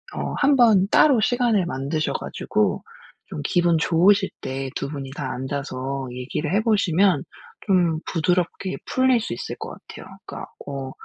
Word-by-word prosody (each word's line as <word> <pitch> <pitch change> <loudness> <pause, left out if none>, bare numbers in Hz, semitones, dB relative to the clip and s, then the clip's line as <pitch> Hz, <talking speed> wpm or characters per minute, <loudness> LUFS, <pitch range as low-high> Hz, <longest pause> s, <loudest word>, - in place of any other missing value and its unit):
어 - - -3
한번 235 -9 +4
따로 275 -6 +5
시간을 235 -4 +2
만드셔 155 0 -2
가지고 - - -1 0.4
좀 - - -6
기분 175 -1 +2
좋으실 190 +5 +3
때 135 0 -4
2 140 - -3
분이 135 -2 -6
다 135 -3 -4
앉아서 135 0 -4
얘기를 135 +6 -4
해 210 - +3
보시면 195 -6 +2 0.4
좀 175 -5 +2
부드럽게 180 +2 -1
풀릴 260 -1 +3
수 165 - -4
있을 115 - -5
것 - - -6
같아요. - - -11 0.2
그러니까 - - -7 0.2
어 135 -1 -5
170 Hz, 290 characters per minute, -23 LUFS, 135-200 Hz, 0.4 s, 따로